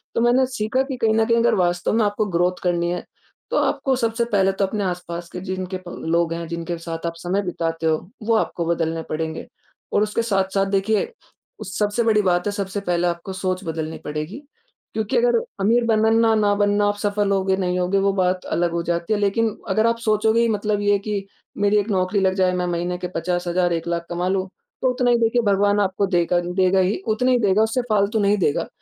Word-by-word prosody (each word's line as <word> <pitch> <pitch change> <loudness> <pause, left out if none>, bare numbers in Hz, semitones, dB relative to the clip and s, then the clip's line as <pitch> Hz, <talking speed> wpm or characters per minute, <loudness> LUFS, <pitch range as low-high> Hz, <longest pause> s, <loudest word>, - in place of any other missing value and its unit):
तो 230 - +2
मैंने 245 +2 +4
सीखा 250 +1 -1
कि 270 -1 -5
कहीं 220 -2 +2
न 225 - +3
कहीं 230 +1 +2
अगर 235 +1 +3
वास्तव 175 +1 +1
में 225 -1 +3
आपको 205 +1 0
ग्रोथ 175 +2 +1
करनी 175 -1 +1
है, 180 - -3 0.5
तो - - +1
आपको 265 -1 +1
सबसे 230 -1 0
पहले 195 -1 +4
तो 195 0 0
अपने 205 +1 -3
आस-पास 175 -2 -4
के 180 - -6
जिनके 185 0 -4
प - - -6
लोग 165 0 -1
हैं, 170 -1 -5
जिनके 170 0 -4
साथ 165 0 -6
आप 165 - -3
समय 180 +4 -1
बिताते 165 -2 -3
हो, 160 +4 -1
वो 225 +1 +2
आपको 170 -5 -1
बदलने 165 -1 -1
पड़ेंगे। 160 +1 -4 0.5
और 205 - +3
उसके 215 +2 -1
साथ-साथ 195 -2 +1
देखिए, 200 +2 +2 0.6
उ - - -5
सबसे 210 +3 0
बड़ी 215 -2 +3
बात 180 -1 +1
है, - - +1
सबसे 200 0 -3
पहले 175 -2 0
आपको 170 +2 -4
सोच 185 0 -2
बदलनी 160 0 -4
पड़ेगी, 155 - -4 0.6
क्योंकि 220 - -1
अगर 480 0 +3 0.2
अमीर 235 +4 +3
बनना 220 -1 +3
ना 225 -1 +4
ना 205 -1 +3
बनना, 205 0 +2
आप 205 - +1
सफल 205 -1 0
होंगे 190 -1 +1
नहीं 180 -1 -1
होंगे 180 +2 +1
वो 195 0 +2
बात 185 -1 0
अलग 170 0 +1
हो 170 - 0
जाती 170 +4 -1
है 205 - 0
लेकिन 210 +2 +1
अगर 220 +4 +3
आप 230 0 +1
सोचोगे 220 +1 +2
ही 235 - +3
मतलब 210 -1 0
ये 205 0 +2
है 200 - +2
कि 205 -1 -3 0.3
मेरी 205 +1 +3
एक 205 - -3
नौकरी 185 +1 +1
लग 190 0 +2
जाए, 185 -1 +2
मैं 180 0 -1
महीने 175 +1 -2
के 180 - -3
50,000, 175 +1 -1
1,00,000 170 -1 0
कमा 175 +1 -2
लूँ, 190 0 0 0.3
तो 260 - +3
उतना 250 -1 +1
ही 240 - +4
देखिए 230 +1 +2
भगवान 205 +1 +2
आपको 195 0 0
देगा 175 -1 +2
देगा 185 +2 +1
ही 185 +2 +1
उतना 235 +4 +2
ही 250 - +3
देगा, 205 -1 +3
उससे 225 +3 0
फालतू 210 +1 +2
नहीं 205 +1 +3
देगा। 150 -5 0
195 Hz, 220 wpm, -22 LUFS, 175-215 Hz, 0.6 s, मैंने